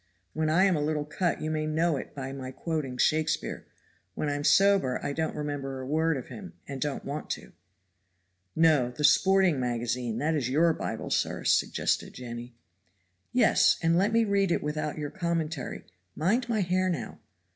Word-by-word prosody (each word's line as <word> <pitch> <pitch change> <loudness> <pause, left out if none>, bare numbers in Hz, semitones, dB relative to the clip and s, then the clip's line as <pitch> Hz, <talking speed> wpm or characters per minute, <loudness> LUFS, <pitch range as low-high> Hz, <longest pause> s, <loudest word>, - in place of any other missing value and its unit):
When 155 0 0
I'm 185 +3 +4
a 150 - -1
little 150 0 -1
cut 170 +4 -1
you 155 - -2
may 155 0 -1
know 160 +1 +1
it 135 - -7
by 135 -1 -5
my 130 -2 -6
quoting 140 -2 -4
Shakespeare. 155 +2 0 0.5
When 150 - -1
I'm 145 0 -2
sober 195 -8 +4
I 140 - -1
don't 160 +1 -2
remember 145 -3 -4
a 130 - -6
word 160 +2 +1
of 125 - -6
him 190 -3 -9
and 135 -2 -6
don't 145 -2 -2
want 145 +2 -5
to." - - -15 1.0
"No, 155 -6 +4
the 125 +4 -6
Sporting 190 0 +4
Magazine, 120 -1 -2
that 155 +5 0
is 135 -5 -1
your 160 +5 +3
Bible, - - -5
sir," - - 0
suggested - - +1
Jenny. 120 -1 -8 0.8
"Yes, 250 - +4
and 165 +1 +3
let 195 +5 +2
me 230 0 +3
read 200 -3 +1
it - - 0
without 150 0 -3
your 150 -1 -4
commentary 165 -5 -3 0.3
mind 230 +10 +1
my 220 -3 +1
hair 185 +1 +1
now. 140 -11 -4
155 Hz, 175 wpm, -28 LUFS, 135-170 Hz, 1.0 s, I'm